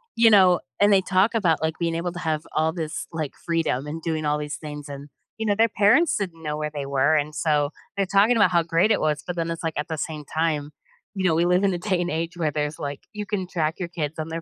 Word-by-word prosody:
you 230 Hz, -1 st, +6 dB
know, 185 Hz, -3 st, +6 dB, 0.2 s
and 205 Hz, +1 st, +5 dB
they 195 Hz, -1 st, +5 dB
talk 190 Hz, +4 st, +2 dB
about, 175 Hz, -9 st, +2 dB
like, 160 Hz, 0 st, -1 dB
being 165 Hz, -1 st, 0 dB
able 175 Hz, +1 st, -2 dB
to 175 Hz, -, -6 dB
have 160 Hz, -3 st, -1 dB
all 160 Hz, +1 st, +2 dB
this, 160 Hz, -3 st, -4 dB
like, 155 Hz, -4 st, -4 dB
freedom 165 Hz, -6 st, 0 dB
and 160 Hz, +2 st, -5 dB
doing 155 Hz, -2 st, -2 dB
all 150 Hz, 0 st, +1 dB
these 150 Hz, -1 st, -4 dB
things 150 Hz, -1 st, -8 dB
and, 140 Hz, +1 st, -8 dB, 0.3 s
you 220 Hz, -, -3 dB
know, 205 Hz, -, +2 dB
their 225 Hz, +2 st, +3 dB
parents 235 Hz, +12 st, +4 dB
didn't 170 Hz, -5 st, -5 dB
know 150 Hz, 0 st, -3 dB
where 150 Hz, 0 st, -2 dB
they 145 Hz, -2 st, -4 dB
were, 140 Hz, +3 st, +2 dB
and 150 Hz, 0 st, 0 dB
so, 150 Hz, -2 st, +1 dB, 0.3 s
they're 195 Hz, -, +1 dB
talking 200 Hz, +5 st, +4 dB
about 205 Hz, -5 st, +4 dB
how 170 Hz, -, +4 dB
great 165 Hz, +5 st, +2 dB
it 210 Hz, -, +3 dB
was, 150 Hz, -1 st, 0 dB
but 180 Hz, -, -4 dB
then 165 Hz, 0 st, -1 dB
it's 165 Hz, 0 st, -5 dB
like, 160 Hz, -1 st, -1 dB
at 150 Hz, -, -2 dB
the 160 Hz, -, -4 dB
same 150 Hz, 0 st, -5 dB
time, 155 Hz, -1 st, -1 dB, 0.4 s
you 190 Hz, -, -2 dB
know, 175 Hz, -, +4 dB
we 170 Hz, +2 st, +2 dB
live 180 Hz, +2 st, +3 dB
in 195 Hz, -2 st, +2 dB
a -, -, -1 dB
day 180 Hz, 0 st, -1 dB
and 175 Hz, -, -2 dB
age 165 Hz, +2 st, -3 dB
where 155 Hz, -3 st, 0 dB
there's, 150 Hz, 0 st, -2 dB
like 140 Hz, -1 st, -4 dB
you 210 Hz, -1 st, -5 dB
can 190 Hz, -2 st, -3 dB
track 160 Hz, -3 st, -1 dB
your 175 Hz, -, -2 dB
kids 160 Hz, -3 st, -4 dB
on 155 Hz, -, -3 dB
their 165 Hz, +1 st, -4 dB
165 Hz, 275 wpm, -24 LUFS, 150-185 Hz, 0.4 s, you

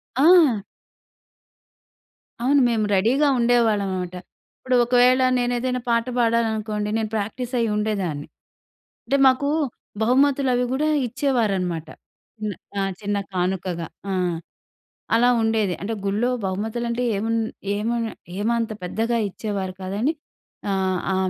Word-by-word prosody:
ఆ! 295 Hz, -, +6 dB, 1.8 s
అవును. 270 Hz, +4 st, +3 dB
మేము 220 Hz, -2 st, +1 dB
రెడీ‌గా 245 Hz, +10 st, +3 dB
ఉండేవాళ్ళం 235 Hz, -4 st, +3 dB
అన్నమాట. 180 Hz, -1 st, -4 dB, 0.4 s
ఇప్పుడు 255 Hz, -1 st, -1 dB
ఒకవేళ 250 Hz, +1 st, +4 dB, 0.2 s
నేనేదైనా 245 Hz, +1 st, -1 dB
పాట 230 Hz, -1 st, +2 dB
పాడాలనుకోండి, 220 Hz, -3 st, 0 dB
నేను 220 Hz, -1 st, -1 dB
ప్రాక్టీస్ 230 Hz, +4 st, -3 dB
అయ్యి 230 Hz, -1 st, +1 dB
ఉండేదాన్ని. 195 Hz, -9 st, -2 dB, 0.8 s
అంటే 275 Hz, +4 st, +1 dB
మాకు 260 Hz, +2 st, +3 dB, 0.6 s
బహుమతులు 270 Hz, +3 st, +3 dB
అవి 250 Hz, 0 st, +1 dB
కూడా 295 Hz, +4 st, +1 dB, 0.2 s
ఇచ్చేవారనమాట. 200 Hz, -, 0 dB, 0.5 s
చిన్న 215 Hz, -1 st, -3 dB, 0.3 s
ఆ! -, -, +1 dB, 0.2 s
చిన్న 205 Hz, 0 st, -1 dB, 0.2 s
కానుకగా. 180 Hz, -2 st, -2 dB, 0.2 s
ఆ! -, -, 0 dB, 1.0 s
అలా 240 Hz, +2 st, +4 dB
ఉండేది. 220 Hz, -4 st, +1 dB
అంటే 210 Hz, +4 st, -3 dB
గుళ్లో 210 Hz, +5 st, +1 dB, 0.2 s
బహుమతులంటే 235 Hz, +5 st, -2 dB
ఏమున్ 225 Hz, +3 st, 0 dB, 0.4 s
ఏమన్ 230 Hz, +3 st, -1 dB, 0.3 s
ఏమంత 230 Hz, +2 st, 0 dB
పెద్దగా 225 Hz, +6 st, -1 dB
ఇచ్చేవారు 195 Hz, -2 st, -4 dB
కాదని. 205 Hz, +11 st, -1 dB, 0.6 s
ఆహ్, 190 Hz, -1 st, 0 dB
ఆ! -, -, +1 dB
225 Hz, 110 wpm, -23 LUFS, 200-245 Hz, 1.8 s, ఆ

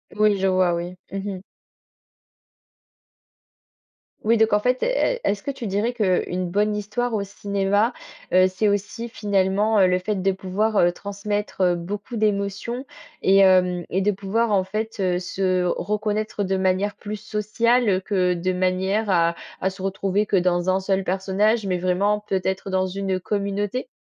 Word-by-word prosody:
Oui, 210 Hz, -1 st, +3 dB
je 195 Hz, -, +2 dB
vois, 185 Hz, -2 st, +3 dB
oui. 175 Hz, +1 st, -4 dB, 0.2 s
Mmh 195 Hz, 0 st, -4 dB
mh. -, -, -9 dB, 2.9 s
Oui 230 Hz, +2 st, +4 dB
donc 220 Hz, 0 st, +3 dB
en 210 Hz, -, +4 dB
fait, 250 Hz, +4 st, 0 dB
est -, -, +1 dB
est-ce 200 Hz, 0 st, 0 dB
que -, -, -5 dB
tu 260 Hz, -3 st, -7 dB
dirais 210 Hz, +4 st, 0 dB
qu'une 185 Hz, -4 st, 0 dB
bonne 210 Hz, +3 st, +1 dB
histoire 225 Hz, +4 st, -2 dB
au 210 Hz, -2 st, 0 dB
cinéma, 200 Hz, +3 st, 0 dB, 0.4 s
heu, 185 Hz, 0 st, +6 dB
c'est 185 Hz, +3 st, 0 dB
aussi, 205 Hz, +4 st, -1 dB
finalement, 205 Hz, 0 st, +1 dB
heu, 190 Hz, -, +6 dB
le 180 Hz, 0 st, +2 dB
fait 190 Hz, +1 st, -2 dB
de 195 Hz, +1 st, +2 dB
pouvoir, 200 Hz, +3 st, -1 dB
heu, 175 Hz, -1 st, +5 dB
transmettre, 200 Hz, +2 st, -4 dB
heu, 180 Hz, -1 st, +4 dB
beaucoup 205 Hz, +7 st, -5 dB
d'émotions 210 Hz, +4 st, -1 dB, 0.4 s
et 195 Hz, +1 st, +4 dB
hem, 180 Hz, -2 st, +4 dB
et 190 Hz, -, 0 dB
de 205 Hz, +2 st, +2 dB
pouvoir 205 Hz, +4 st, -1 dB
en 190 Hz, -2 st, +2 dB
fait, 215 Hz, +3 st, -4 dB
heu, 180 Hz, -2 st, +1 dB
se 185 Hz, 0 st, 0 dB
reconnaître 210 Hz, +3 st, -1 dB
de 190 Hz, 0 st, 0 dB
manière 190 Hz, +2 st, 0 dB
plus 210 Hz, 0 st, -5 dB
sociale, 215 Hz, 0 st, +1 dB
que 185 Hz, -3 st, +1 dB
de 180 Hz, +1 st, -1 dB
manière 185 Hz, +3 st, 0 dB
à 170 Hz, -2 st, +3 dB, 0.3 s
à 190 Hz, -, +1 dB
se 190 Hz, 0 st, -10 dB
retrouver 195 Hz, +1 st, 0 dB
que 205 Hz, -, 0 dB
dans 180 Hz, 0 st, +2 dB
un 190 Hz, +1 st, +2 dB
seul 190 Hz, 0 st, 0 dB
personnage, 200 Hz, +4 st, +1 dB
mais 185 Hz, -2 st, 0 dB
vraiment, 185 Hz, +4 st, +1 dB
peut-être, 190 Hz, 0 st, -2 dB
dans 190 Hz, 0 st, +1 dB
une 190 Hz, 0 st, -2 dB
communauté? 205 Hz, +5 st, -2 dB
195 Hz, 165 wpm, -23 LUFS, 185-210 Hz, 2.9 s, heu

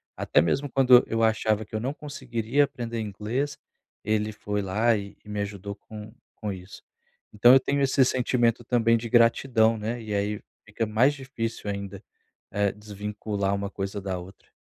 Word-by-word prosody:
até -, -, +2 dB
mesmo 135 Hz, -, 0 dB
quando 125 Hz, -2 st, +6 dB
eu 115 Hz, 0 st, 0 dB
achava 110 Hz, -1 st, +2 dB
que -, -, -31 dB
eu 110 Hz, -, -1 dB
não 130 Hz, +5 st, -2 dB
conseguiria 130 Hz, -2 st, -1 dB
aprender 115 Hz, -3 st, -5 dB
inglês, 110 Hz, +7 st, -3 dB, 0.5 s
ele 110 Hz, 0 st, 0 dB
foi 105 Hz, -1 st, -3 dB
lá 110 Hz, +5 st, +2 dB
e 100 Hz, -1 st, -6 dB
e 105 Hz, -, -14 dB
me 105 Hz, 0 st, -3 dB
ajudou 100 Hz, -1 st, -4 dB
com 105 Hz, +1 st, -11 dB, 0.2 s
com 105 Hz, -2 st, -4 dB
isso. 95 Hz, 0 st, -10 dB, 0.5 s
Então, 120 Hz, +4 st, +7 dB
eu 135 Hz, -, +8 dB
tenho 140 Hz, +2 st, -1 dB
esse 135 Hz, -1 st, +4 dB
sentimento 120 Hz, -2 st, +1 dB
também 115 Hz, -1 st, +3 dB
de 115 Hz, 0 st, -5 dB
gratidão, 115 Hz, -1 st, +4 dB
né? 115 Hz, +3 st, -4 dB
E 110 Hz, -2 st, -5 dB
aí 100 Hz, +1 st, -1 dB, 0.3 s
fica 105 Hz, +2 st, -2 dB
mais 115 Hz, +7 st, +3 dB
difícil 125 Hz, -6 st, -5 dB
ainda, 100 Hz, 0 st, -5 dB, 0.5 s
eh, 100 Hz, -1 st, +1 dB
desvincular 105 Hz, -1 st, -3 dB
uma 100 Hz, 0 st, -3 dB
coisa 100 Hz, 0 st, -4 dB
da 95 Hz, -2 st, -3 dB
outra. 95 Hz, +3 st, -13 dB
110 Hz, 170 wpm, -26 LUFS, 105-120 Hz, 0.5 s, eu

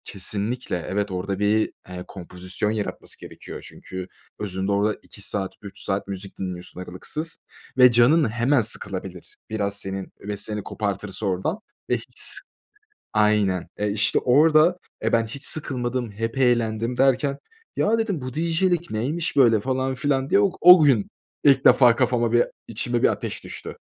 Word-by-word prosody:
Kesinlikle 105 Hz, +5 st, -3 dB
evet 100 Hz, +1 st, -1 dB
orada 95 Hz, +1 st, -3 dB
bir, 105 Hz, +1 st, +2 dB, 0.2 s
eee, 90 Hz, 0 st, -6 dB
kompozisyon 90 Hz, +2 st, -4 dB
yaratması 105 Hz, -2 st, -4 dB
gerekiyor. -, -, -10 dB
Çünkü 95 Hz, -1 st, -8 dB, 0.3 s
özünde 95 Hz, -1 st, -2 dB
orada 105 Hz, +2 st, +1 dB
2 100 Hz, -, -13 dB
saat 95 Hz, -1 st, -3 dB
3 100 Hz, -2 st, -9 dB
saat 95 Hz, +1 st, 0 dB
müzik 100 Hz, 0 st, -7 dB
dinliyorsun 90 Hz, -1 st, -6 dB
aralıksız 150 Hz, -, -5 dB, 0.4 s
ve 125 Hz, -1 st, +8 dB
canın 125 Hz, +4 st, +4 dB
hemen 120 Hz, +4 st, +2 dB
sıkılabilir. 95 Hz, -4 st, -3 dB
Biraz 100 Hz, -2 st, -1 dB
senin 95 Hz, -1 st, -5 dB
ve 105 Hz, 0 st, -5 dB
seni 105 Hz, 0 st, -4 dB
kopartırsa 100 Hz, -1 st, -3 dB
oradan 95 Hz, -, -1 dB, 0.3 s
ve -, -, +2 dB
hiç -, -, 0 dB, 0.8 s
aynen, 105 Hz, -4 st, +2 dB
eee, 105 Hz, 0 st, 0 dB
işte 105 Hz, +2 st, +2 dB
orada 155 Hz, +6 st, +4 dB, 0.3 s
e 110 Hz, -, +1 dB
ben 115 Hz, -1 st, +3 dB
hiç 135 Hz, +6 st, -8 dB
sıkılmadım, 125 Hz, -5 st, -1 dB
hep 115 Hz, +5 st, -4 dB
eğlendim 120 Hz, -2 st, +1 dB
derken 135 Hz, +1 st, +2 dB, 0.4 s
ya 225 Hz, +2 st, +2 dB
dedim 200 Hz, -9 st, -1 dB
bu 130 Hz, 0 st, -6 dB
DJ'lik 170 Hz, +2 st, 0 dB
neymiş 150 Hz, +10 st, -2 dB
böyle 120 Hz, -5 st, +5 dB
falan 130 Hz, +3 st, -1 dB
filan 135 Hz, 0 st, 0 dB
diye -, -, +4 dB
ok 190 Hz, -2 st, +1 dB
o 180 Hz, -2 st, +9 dB
gün 130 Hz, -9 st, +3 dB, 0.4 s
ilk 135 Hz, -2 st, +5 dB
defa 120 Hz, -3 st, +7 dB
kafama 120 Hz, -2 st, +1 dB
bir, 120 Hz, 0 st, +5 dB, 0.2 s
içime 120 Hz, +2 st, -1 dB
bir -, -, +7 dB
ateş -, -, -3 dB
düştü. -, -, -8 dB
115 Hz, 155 wpm, -24 LUFS, 100-135 Hz, 0.8 s, o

